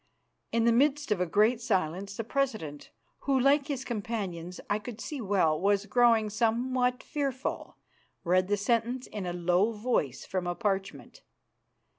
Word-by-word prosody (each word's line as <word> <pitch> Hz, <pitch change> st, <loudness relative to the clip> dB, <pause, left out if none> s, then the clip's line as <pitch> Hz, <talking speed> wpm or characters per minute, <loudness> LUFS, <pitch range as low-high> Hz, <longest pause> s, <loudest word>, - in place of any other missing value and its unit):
In 230 Hz, 0 st, +2 dB
the 235 Hz, -, +5 dB
midst 285 Hz, +2 st, +2 dB
of 195 Hz, -4 st, +1 dB
a 180 Hz, -, +1 dB
great 215 Hz, +7 st, +3 dB
silence 195 Hz, -2 st, -1 dB
the 230 Hz, -, -2 dB
president, 215 Hz, -, -2 dB, 0.3 s
who, 270 Hz, -1 st, +1 dB
like 280 Hz, +2 st, +3 dB
his 275 Hz, -3 st, -3 dB
companions, 200 Hz, -7 st, -4 dB
I 205 Hz, -, 0 dB
could 225 Hz, +1 st, -8 dB
see 285 Hz, +2 st, -5 dB
well, 185 Hz, -7 st, +2 dB
was 200 Hz, +1 st, +2 dB
growing 225 Hz, -1 st, +3 dB
somewhat 250 Hz, +3 st, +1 dB
fearful, 275 Hz, -3 st, -3 dB, 0.5 s
read 185 Hz, +1 st, +2 dB
the 205 Hz, +1 st, +1 dB
sentence 235 Hz, +4 st, 0 dB
in 200 Hz, -4 st, -6 dB
a -, -, -1 dB
low 180 Hz, +5 st, +2 dB
voice 210 Hz, -, -1 dB
from 185 Hz, -2 st, -3 dB
a 175 Hz, -, -1 dB
parchment. 195 Hz, -3 st, -3 dB
215 Hz, 155 wpm, -29 LUFS, 190-250 Hz, 0.5 s, the